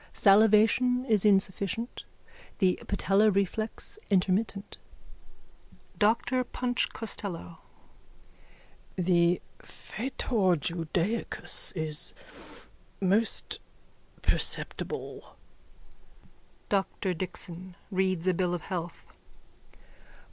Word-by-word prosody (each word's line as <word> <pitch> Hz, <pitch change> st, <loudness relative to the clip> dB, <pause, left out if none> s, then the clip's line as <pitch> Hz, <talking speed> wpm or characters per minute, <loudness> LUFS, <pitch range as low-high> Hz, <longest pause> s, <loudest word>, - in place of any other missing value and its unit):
Salivation 220 Hz, +5 st, +5 dB
is 215 Hz, -5 st, +2 dB
insufficient, 200 Hz, +3 st, +1 dB, 0.5 s
the 185 Hz, -3 st, +2 dB
patellar 200 Hz, +2 st, +3 dB
reflex 215 Hz, -, -2 dB
intermittent. 195 Hz, +1 st, 0 dB, 1.2 s
DR 235 Hz, +4 st, +3 dB
PUNCH 245 Hz, -1 st, 0 dB
COSTELLO: 185 Hz, -6 st, -3 dB, 1.4 s
The 175 Hz, -1 st, +3 dB, 0.2 s
fetor 215 Hz, -5 st, -1 dB
judaicus 170 Hz, +7 st, -2 dB
is 155 Hz, -3 st, -2 dB, 0.9 s
most 200 Hz, +4 st, +1 dB, 0.6 s
perceptible. -, -, -2 dB, 1.4 s
DR 195 Hz, -1 st, 0 dB
DIXON: 180 Hz, 0 st, -4 dB, 0.2 s
_(Reads 185 Hz, -2 st, +1 dB
a 185 Hz, -, +4 dB
bill 180 Hz, 0 st, 0 dB
of 170 Hz, -, -6 dB
health.) 175 Hz, -3 st, -5 dB
195 Hz, 70 wpm, -29 LUFS, 180-220 Hz, 1.4 s, Salivation